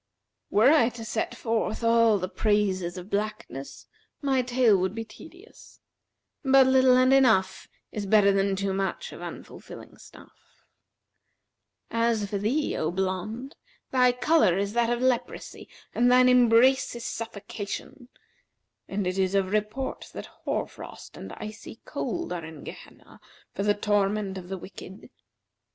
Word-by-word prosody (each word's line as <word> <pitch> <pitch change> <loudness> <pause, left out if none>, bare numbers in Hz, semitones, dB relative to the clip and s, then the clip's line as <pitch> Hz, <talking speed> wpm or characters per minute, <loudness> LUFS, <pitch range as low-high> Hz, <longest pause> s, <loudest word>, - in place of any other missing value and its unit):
Were 225 +7 +5
I 290 -7 +4
to 225 - -7
set 220 0 -3
forth 225 0 -2
all 230 -2 +4
the 185 -1 -3
praises 190 -4 0
of 180 +3 -9
blackness, 205 -9 -4 0.3
my 270 -3 +1
tale 245 -3 +3
would 190 +2 -1
be 225 0 -4
tedious; 350 - -16 0.6
but 270 -1 +6
little 260 -1 +5
and 255 +1 +4
enough 225 -8 +3 0.2
is 205 -2 -4
better 200 -1 +5
than 195 0 +1
too 195 0 -2
much 195 0 -3
of - - -10
unfilling - - -10
stuff. - - -18 1.3
As 230 -2 +1
for 200 0 -3
thee, 260 +9 0
O 155 - -1
blonde, 190 - -3 0.4
thy 250 -1 +4
colour 250 - +3
is 200 +1 -2
that 235 0 +1
of 240 +1 -1
leprosy 255 -2 -2 0.2
and 245 +1 +3
thine 250 0 +6
embrace 250 +1 +4
is 235 - -7
suffocation;[FN#368] 225 +2 -6 0.8
and 195 0 -3
it 185 +1 -2
is 190 +1 +1
of 195 -1 +1
report 215 +5 -3
that - - -7
hoar - - -4
frost - - -12
and - - -9
icy 215 +2 -9
cold[FN#369] 245 - -4
are 175 -2 -4
in 160 -3 -10
Gehenna - - -12 0.3
for - - -4
the 205 0 +2
torment 205 -1 0
of 180 -1 -12
the 190 - -4
wicked. 190 +1 -11
215 Hz, 145 wpm, -26 LUFS, 195-250 Hz, 1.3 s, but